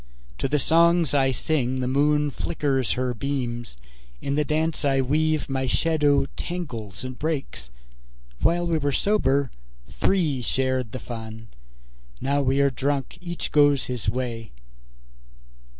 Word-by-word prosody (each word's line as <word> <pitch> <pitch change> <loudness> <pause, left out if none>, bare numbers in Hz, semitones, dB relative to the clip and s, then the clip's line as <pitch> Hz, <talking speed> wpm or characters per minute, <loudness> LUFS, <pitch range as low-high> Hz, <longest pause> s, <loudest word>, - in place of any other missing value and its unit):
To - - 0
the 145 +2 +1
songs 165 +1 +3
I 135 -2 +3
sing 130 -1 -1
the 125 - -1
moon 145 +2 +2
flickers 135 -5 -1
her 125 0 -1
beams; 120 - -3 0.4
In 140 - -2
the 150 +1 +2
dance 155 +1 -1
I 135 -1 +2
weave 155 +3 +1
my 130 -1 -1
shadow 150 -1 +2
tangles 120 - -5
and 130 -1 -6
breaks. 145 - -3 0.7
While 175 +1 +2
we 165 -2 +1
were 145 -1 0
sober, 140 - +2 0.4
three 160 -9 +1
shared 130 -1 -1
the 130 - -4
fun; 110 -2 -8 0.7
Now 140 +1 +1
we 135 +1 +2
are 140 0 +3
drunk, 140 +5 -2
each 175 -1 -5
goes 145 -3 +4
his 120 -5 -2
way. 115 -1 -3
140 Hz, 135 wpm, -25 LUFS, 125-150 Hz, 0.7 s, goes